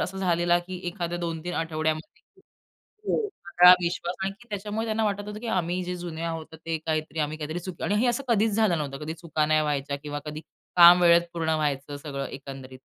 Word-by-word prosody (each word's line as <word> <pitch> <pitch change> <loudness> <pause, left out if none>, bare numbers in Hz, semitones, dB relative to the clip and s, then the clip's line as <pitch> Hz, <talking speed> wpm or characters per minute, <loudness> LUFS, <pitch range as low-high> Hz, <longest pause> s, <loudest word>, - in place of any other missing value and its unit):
असं 190 +1 -3
झालेला, 175 -2 +2
की 180 +1 -7
एखाद्या 175 0 -3
2-3 170 0 -4
आठवड्यामध्ये 160 - -3 0.7
हो, 435 -2 +1 0.2
सगळा 175 +1 +8
विश्वास, 175 0 -2
आणखी 210 +5 -6
त्याच्यामुळे 210 +2 -3
त्यांना 220 0 0
वाटत 205 -1 -1
होतं 210 - -6
की 240 - -6
आम्ही 180 -3 0
जे 180 0 -4
जुने 170 -2 -6
आहोत 165 -1 -5
ते 165 -1 -1
काहीतरी 155 -1 -2
आम्ही 150 +1 -2
काहीतरी 155 +2 -4
चुकी 180 -1 -8
आणि 200 - +1
हे 250 - +3
असं 240 +3 0
कधीच 220 -2 +3
झालं 215 -5 +3
नव्हतं. 140 -2 -4
कधी 160 +1 -4
चुका 160 -2 -1
नाही 155 0 +3
व्हायच्या 145 -1 -1
किंवा 145 0 -4
कधी 150 0 -5 0.4
काम 175 0 +9
वेळेत 170 0 +6
पूर्ण 165 -2 -1
व्हायचं 145 -1 -2
सगळं 140 -1 -5
एकंदरीत. 135 -1 -9
170 Hz, 195 wpm, -26 LUFS, 155-185 Hz, 0.7 s, काम